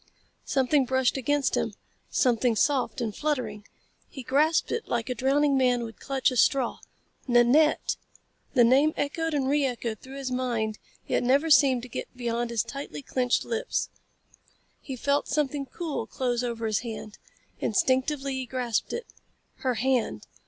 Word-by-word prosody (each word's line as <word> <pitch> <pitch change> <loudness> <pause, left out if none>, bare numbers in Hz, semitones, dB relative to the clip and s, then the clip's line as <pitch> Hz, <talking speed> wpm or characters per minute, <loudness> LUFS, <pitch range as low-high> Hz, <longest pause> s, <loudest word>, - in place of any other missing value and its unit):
Something 270 +1 +2
brushed 260 0 +1
against 280 +1 +1
him - - -1 0.3
something 245 -2 +2
soft 270 +2 +1
and 220 -4 -2
fluttering. 235 -9 -2 0.4
He 270 -5 -8
grasped 300 +6 +2
it 465 - -2
like 235 0 -2
a - - +1
drowning 275 +4 +2
man 250 -2 +2
would 225 -1 -8
clutch 270 -1 0
a 255 - -3
straw. 260 0 +2 0.5
"Nanette!" 250 +6 +4 0.6
The 245 - +7
name 275 +6 +4
echoed 320 +2 -1
and 270 -2 0
re 290 +1 +2
echoed 235 -4 -2
through 265 +1 -10
his 270 -2 -4
mind 235 -4 -1 0.3
yet - - 0
never 275 +6 +2
seemed 265 -5 +5
to - - -7
get 250 - -7
beyond 240 -1 -1
his 235 -2 0
tightly 280 0 -7
clenched 250 -2 0
lips. 470 +1 -2 0.9
He 265 - -6
felt 280 +3 0
something 285 -1 -1
cool 320 +2 -4
close 245 -2 -1
over 230 -2 -3
his 215 -2 +1
hand. 220 -2 -7 0.4
Instinctively 265 +5 +1
he 260 -1 -3
grasped 245 -4 -2
it. 475 - -4 0.5
Her 255 -2 -1
hand. 255 0 0
260 Hz, 155 wpm, -27 LUFS, 240-280 Hz, 0.9 s, The